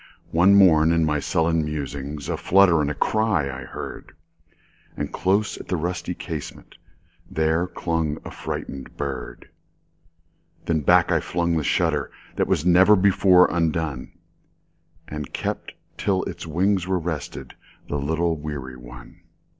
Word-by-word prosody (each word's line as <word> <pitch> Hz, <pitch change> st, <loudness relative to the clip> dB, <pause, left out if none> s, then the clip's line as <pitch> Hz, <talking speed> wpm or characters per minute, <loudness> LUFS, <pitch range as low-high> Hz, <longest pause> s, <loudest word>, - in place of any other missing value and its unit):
One 90 Hz, +4 st, +5 dB
morn, 80 Hz, -5 st, +6 dB
in 85 Hz, -1 st, +2 dB
my 75 Hz, -1 st, +1 dB
sullen 80 Hz, +2 st, +1 dB
musings,A 70 Hz, -1 st, -4 dB
flutter 90 Hz, -4 st, +4 dB
and 75 Hz, 0 st, -2 dB
cry 110 Hz, -8 st, +1 dB
I 65 Hz, 0 st, -8 dB
heard; -, -, -8 dB, 0.8 s
And -, -, -4 dB
close 100 Hz, +3 st, 0 dB
at -, -, -10 dB
the 90 Hz, -, -1 dB
rusty 85 Hz, +2 st, -3 dB
casementThere 80 Hz, +3 st, -5 dB
clung 80 Hz, -3 st, -1 dB
a -, -, -7 dB
frightened 70 Hz, -1 st, -6 dB
bird. 70 Hz, +2 st, -6 dB, 1.1 s
Then 80 Hz, -1 st, +1 dB
back 70 Hz, -, +4 dB
I -, -, +3 dB
flung 85 Hz, 0 st, -1 dB
the 80 Hz, -, +1 dB
shutterThat 75 Hz, -3 st, -1 dB
was 75 Hz, -, 0 dB
never 95 Hz, +4 st, +6 dB
before 95 Hz, -2 st, +5 dB
undone, 80 Hz, -5 st, -1 dB, 1.0 s
And 75 Hz, -1 st, -5 dB
I -, -, -7 dB
kept -, -, -4 dB, 0.3 s
till 95 Hz, -2 st, +1 dB
its -, -, -7 dB
wings 90 Hz, +3 st, +1 dB
were 95 Hz, -1 st, +1 dB
restedThe 80 Hz, -4 st, -5 dB, 0.4 s
little 80 Hz, +4 st, 0 dB
weary 70 Hz, -4 st, -6 dB
one. -, -, -13 dB
80 Hz, 130 wpm, -23 LUFS, 75-90 Hz, 1.1 s, morn